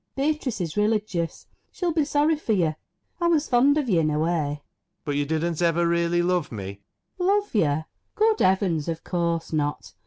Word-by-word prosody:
Beatrice 280 -4 -1
is 165 -4 -3
religious. 210 -5 -1 0.3
She'll 350 -3 -2
be 310 -2 +2
sorry 295 +2 +2
for 265 -7 -1
you. 170 -6 +2 0.5
I 345 - +2
was 320 -3 +2
fond 270 +4 +4
of 295 -4 0
you 185 -7 +3
in 155 -1 +2
a 150 - 0
way. 155 +2 +1
ALAN. 150 -3 -1 0.5
But 145 -2 -2
you 145 0 0
didn't 160 +2 -1
ever 170 0 +2
really 170 0 +1
love 180 -2 0
me? 100 -2 -7 0.4
FANNY. 360 +1 +1
Love 410 0 +1
you? 155 -7 +2 0.3
Good 440 0 +3
heavens, 185 -5 +2
of 165 -1 -4
course 170 -2 -2
not 145 -1 -2
175 Hz, 190 wpm, -25 LUFS, -, 0.5 s, fond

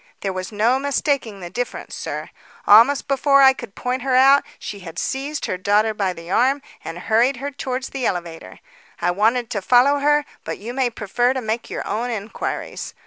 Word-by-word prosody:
There 195 -1 -2
was 185 +1 -5
no 225 +5 +2
mistaking 275 -7 -1
the 175 -1 -7
difference, 245 0 -5
sir. - - -5 0.3
Almost 235 +7 +6
before 275 0 +4
I 265 0 +8
could 240 -6 -10
point 250 +1 -2
her 260 0 0
out, 270 +2 +6
she 205 - -7
had 175 -3 -10
seized 280 +7 -3
her 185 - -2
daughter 210 +3 +2
by 200 -3 -1
the 170 0 -9
arm 265 +6 +2 0.2
and 165 +1 -6
hurried 230 +8 +2
her 280 +3 -4
towards 260 -1 -4
the 265 -3 -2
elevator. 170 -2 -5 0.4
I 175 - +1
wanted 225 +5 +1
to 200 - -2
follow 255 +7 +4
her, 295 +1 +2 0.2
but - - -5
you 230 +4 -7
may 260 -1 +1
prefer 240 +3 0
to - - 0
make 225 0 -3
your - - -5
own 230 +4 -2
inquiries. 220 -2 -5
240 Hz, 195 wpm, -21 LUFS, 205-270 Hz, 0.4 s, I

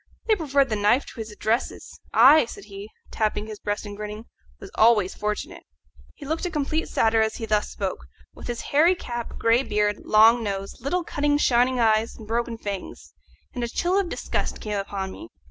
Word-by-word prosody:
They 440 - +3
preferred 280 -6 +1
the 215 - 0
knife 210 +6 +2
to - - -12
his 220 -1 -5
addresses. 220 +3 -3
I," 270 +6 +7
said - - -10
he, 200 0 -9 0.2
tapping 215 -1 -1
his 215 -1 -8
breast 205 +1 -3
and 205 0 -7
grinning, 210 +1 -7 0.3
"was 195 - -11
always 215 -4 +4
fortunate." 210 0 -4 0.5
He 290 - -11
looked 320 +3 -2
a 360 - -1
complete 310 +1 -2
satyr 225 0 +2
as 220 0 0
he 225 - -5
thus 210 -1 0
spoke, - - -4 0.3
with - - -10
his 240 -1 -4
hairy 325 +6 +3
cap, 240 -8 -6
grey 230 +2 +3
beard, 210 -4 0
long 225 +3 +5
nose, 195 -1 -5
little 345 +8 -1
cunning 290 -2 0
shining 250 -2 +2
eyes, 220 0 +2
and 220 - -12
broken 235 +1 -2
fangs; 200 -3 -7 0.4
and 245 - -4
a - - -1
chill 355 +9 0
of 390 -3 +1
disgust - - -3
came 210 -2 -3
upon 195 -1 -4
me. 330 - -10
225 Hz, 195 wpm, -24 LUFS, 210-275 Hz, 0.5 s, I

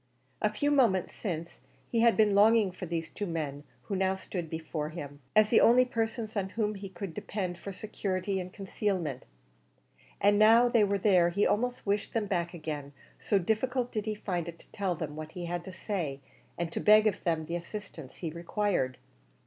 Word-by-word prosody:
A - - +2
few 290 0 0
moments 230 -11 +3
since 170 -5 -5 0.3
he 235 - +2
had 230 0 +5
been 215 -2 +4
longing 210 0 +5
for 180 0 -7
these 165 -1 -3
two 205 - -4
men 150 -4 -3 0.2
who 200 - -3
now 190 0 +1
stood 180 -3 -5
before 160 -1 -4
him, 145 -3 -8 0.2
as 215 0 +5
the 235 - +6
only 250 +2 +6
persons 225 -2 -2
on 195 -2 -1
whom 215 0 -1
he 195 -1 -7
could 185 -1 -6
depend 180 -1 -4
for 200 - -6
security 195 -1 -2
and 180 0 -6
concealment, 185 - -2 0.9
and 205 +1 +4
now 225 +3 +7
that 245 - +1
they 230 -3 +6
were 200 0 +2
there 185 -3 +4
he 200 +4 +1
almost 245 +3 0
wished 205 +2 -1
them 225 -2 +1
back 175 -3 -1
again, 150 -3 -5 0.3
so 205 - +2
difficult 240 +6 0
did 215 -2 -2
he 215 - -1
find 175 -5 -3
it 170 - -9
to - - -19
tell 190 -3 -1
them 155 -2 -5
what 155 0 -7
he 175 -1 -5
had 175 0 -3
to 190 - -7
say, 170 -7 -3 0.4
and 170 -1 -2
to - - -3
beg 215 +1 +6
of 210 -3 0
them 165 -2 0
the 170 - -3
assistance 170 -5 -7
he 165 -3 -4
required. 170 - -1
190 Hz, 200 wpm, -30 LUFS, 170-215 Hz, 0.9 s, now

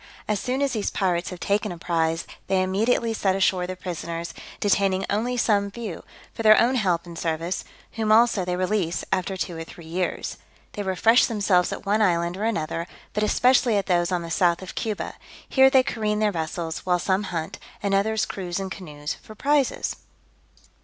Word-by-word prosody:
As 210 -2 0
soon 260 +5 -1
as 275 - 0
these 215 -3 -1
pirates 180 -3 0
have 180 - -8
taken 200 +1 0
a 175 - -6
prize, 165 -1 0 0.2
they 190 -1 +2
immediately 225 +5 +1
set 195 -3 +1
ashore 185 -2 +2
the 185 - -4
prisoners, 170 -2 -5 0.3
detaining 195 -2 +2
only 235 +5 0
some 205 -4 +2
few, 210 -5 -6 0.3
for - - -5
their 215 -1 +7
own 240 +3 +3
help 185 -9 +1
and 170 -1 -9
service: 165 +2 -2 0.3
whom, 220 -1 -1
also, 225 -3 +5
they 180 0 -1
release, 185 -2 -1
after 190 +1 -1
two 175 0 -3
or 165 - -5
three 165 0 -12
years. 175 +3 -3 0.4
They 205 - -4
refresh 205 +5 +4
themselves 200 -5 +2
at - - -6
one 210 +2 +2
island 170 -3 +2
or 205 +3 -2
another, 170 -5 -2 0.3
but 210 - -1
especially 245 +1 +3
at 200 - 0
those 175 -1 +1
on 175 -2 0
the 165 - -7
south 175 -1 +2
of 185 - -8
Cuba; 215 -3 -3 0.3
here 265 0 +6
they 265 -1 +5
careen 215 -4 -1
their 210 -1 +2
vessels, 165 -1 -3
while 180 -1 +1
some 190 +2 +1
hunt, 165 -4 -4 0.2
and 200 -1 0
others 215 +2 +2
cruise 180 -2 -4
in 190 -1 -4
canoes 150 -6 -5
for 215 - -13
prizes. 285 +2 +1
190 Hz, 190 wpm, -24 LUFS, 175-215 Hz, 0.4 s, their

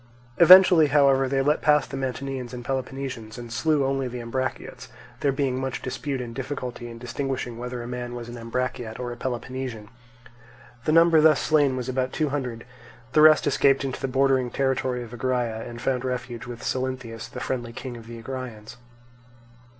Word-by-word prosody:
Eventually, 180 -2 +9
however, 135 -2 +4
they 135 0 +1
let 150 +2 +2
pass 150 -2 +4
the - - -8
Mantineans 130 -1 -4
and 120 -1 -8
Peloponnesians, 130 -4 -4
and 120 -1 -8
slew 150 +2 +2
only 135 -1 0
the 125 0 -6
Ambraciots, 130 +3 -4 0.3
there 140 - +2
being 135 -1 -1
much 135 -1 -4
dispute 135 +1 -3
and 120 -1 -6
difficulty 125 -2 -5
in 115 - -9
distinguishing 125 0 -4
whether 125 0 -5
a - - -7
man 120 0 -5
was 120 -1 -7
an 120 - -8
Ambraciot 115 -1 -4
or 125 -1 -4
a - - -6
Peloponnesian. 125 -3 -5 1.0
The - - +2
number 165 0 +6
thus 155 -2 +5
slain 145 -4 +2
was 125 -1 -4
about 130 0 -1
two 155 -2 0
hundred; 125 -5 -4 0.5
the 150 - +5
rest 155 0 +7
escaped 135 0 +3
into 130 - -4
the - - -1
bordering 130 -1 +2
territory 130 -1 -1
of 120 0 -11
Agraea, 120 -2 -1
and 120 0 -8
found 125 0 -1
refuge 125 -2 -4
with 120 -1 -8
Salynthius, 125 -3 -3
the - - -7
friendly 120 -3 -3
king 125 +1 -7
of 115 -1 -11
the 115 0 -8
Agraeans. 120 -2 -7
130 Hz, 180 wpm, -25 LUFS, 120-135 Hz, 1.0 s, Eventually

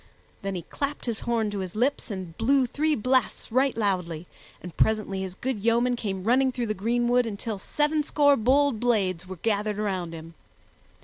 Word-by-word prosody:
Then 195 -1 -3
he 175 - -4
clapped 285 - -4
his 230 -3 -1
horn 225 -3 0
to 205 - -3
his 185 0 -5
lips 255 +5 0
and 185 -5 -6
blew 260 +5 +3
three 305 +5 0
blasts 255 -1 0
right 260 +1 +2
loudly, 180 -6 -1 0.3
and 180 -2 -10
presently 215 -3 +1
his 185 -1 -5
good 255 +1 -3
yeomen 235 +2 +3
came 195 -5 -4
running 260 +4 +3
through 245 -1 -2
the 215 - -1
greenwood 240 +4 +1
until 210 0 -4
sevenscore 295 +2 +2
bold 275 -1 +3
blades 190 -7 0
were 185 - -6
gathered 210 +2 -1
around 190 -5 -2
him. 165 +1 -10
220 Hz, 175 wpm, -26 LUFS, 190-255 Hz, 0.3 s, blew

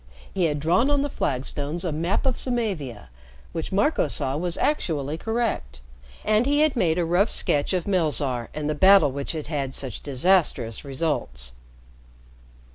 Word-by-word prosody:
He 185 -3 +1
had 150 -2 0
drawn 180 - +2
on 285 -1 +2
the 290 - -2
flagstones 145 - -2
a 170 - -1
map 165 - -1
of 260 -2 +1
Samavia 185 - -2 0.4
which 165 +2 -4
Marco 250 +11 +2
saw 135 -2 -1
was 175 +2 -2
actually 155 - -1
correct, 220 - -2 0.5
and 215 +4 +3
he 290 +1 +3
had 310 -2 +3
made 170 -8 +1
a 175 - +1
rough 180 +6 +2
sketch 145 -1 +1
of 180 -3 -1
Melzarr 145 - 0
and 150 0 -4
the 150 - 0
battle 190 -2 +6
which 140 +3 -4
had 155 -2 -5
had 140 -4 -3
such 130 -5 -4
disastrous 140 - +2
results. 130 - -2
160 Hz, 160 wpm, -24 LUFS, 140-200 Hz, 0.5 s, battle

